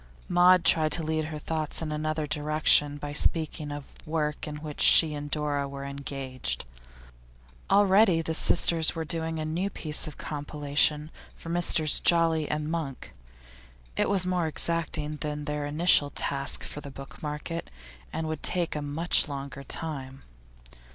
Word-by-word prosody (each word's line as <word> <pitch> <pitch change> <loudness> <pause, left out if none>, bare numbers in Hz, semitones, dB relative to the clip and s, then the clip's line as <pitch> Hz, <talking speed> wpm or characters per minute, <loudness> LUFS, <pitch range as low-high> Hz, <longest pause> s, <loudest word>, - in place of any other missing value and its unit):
Maud 180 0 +5
tried 155 -1 +4
to 165 - -1
lead 155 0 -1
her 155 0 -6
thoughts 155 0 -3
in 160 -2 -4
another 155 0 -2
direction 150 -1 +2
by 145 0 -6
speaking 155 -1 +3
of 145 -1 -8
work 155 -1 -2
in 150 - -5
which 150 0 -7
she 160 -2 +6
and 145 0 -6
Dora 145 -2 -1
were 140 0 -7
engaged. 135 - -4 1.0
Already 195 -3 +4
the 160 - -2
sisters 165 0 +4
were 165 -1 -3
doing 160 0 -2
a 155 - -3
new 170 +6 -2
piece 155 -6 -1
of 150 - -9
compilation 150 +1 -1 0.2
for 165 - -10
Messrs 170 -3 +3
Jolly 165 -3 +3
and 150 0 -2
Monk; 155 -6 -5 0.8
it - - +1
was 195 -3 +2
more 180 -2 0
exacting 155 -2 -2
than 150 -1 -4
their 150 -1 -3
initial 150 -1 +3
task 140 -1 -1
for 145 - -7
the 140 - -9
book 135 0 -11
market, 150 +3 -5 0.4
and 160 0 -3
would 155 -1 -4
take 175 -3 -1
a 150 - -2
much 155 +5 +1
longer 140 -1 -6
time. 135 -4 -5
155 Hz, 155 wpm, -27 LUFS, 145-165 Hz, 1.0 s, she